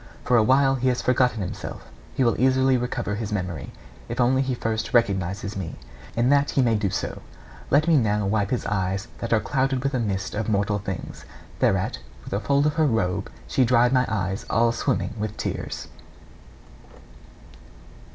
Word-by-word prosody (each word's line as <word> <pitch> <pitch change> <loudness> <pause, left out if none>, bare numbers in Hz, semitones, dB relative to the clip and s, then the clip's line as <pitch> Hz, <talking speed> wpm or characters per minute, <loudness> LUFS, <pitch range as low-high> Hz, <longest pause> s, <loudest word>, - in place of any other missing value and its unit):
For 125 - +3
awhile 130 +4 +4
he 130 -1 0
has 125 -1 +2
forgotten 125 -3 +2
himself; 90 - -6 0.3
he 135 - +2
will 115 - +3
easily 130 0 +4
recover 125 -3 -2
his 105 0 -4
memory, 90 -6 -3 0.4
if 120 +2 -4
only 130 +2 +3
he 130 -1 -1
first 110 0 -2
recognises 100 -2 +1
me. 90 -5 -5 0.4
And 120 +3 +3
that 145 0 +3
he 135 - +2
may 115 -2 +3
do 105 -2 +1
so, 95 +1 -4 0.5
let 150 +4 +3
me 165 -2 +5
now 105 -4 +1
wipe 100 0 +1
his 125 - -1
eyes 95 +1 -1
that 115 - -4
are 115 - +4
clouded 135 0 0
with 140 +1 -1
a 130 - +1
mist 100 -4 -2
of 110 +1 -2
mortal 105 0 +1
things.' 95 -2 -6 0.4
Thereat, - - +1 0.2
with - - -7
a 100 - +1
fold 140 +7 +2
of 150 - +2
her 155 - +4
robe, 100 -5 0 0.2
she 130 - +2
dried 120 +1 +4
my 125 -1 +3
eyes 95 -2 -2
all 115 0 +3
swimming 120 0 -1
with 105 0 -4
tears. - - -4
115 Hz, 180 wpm, -24 LUFS, 100-130 Hz, 0.5 s, me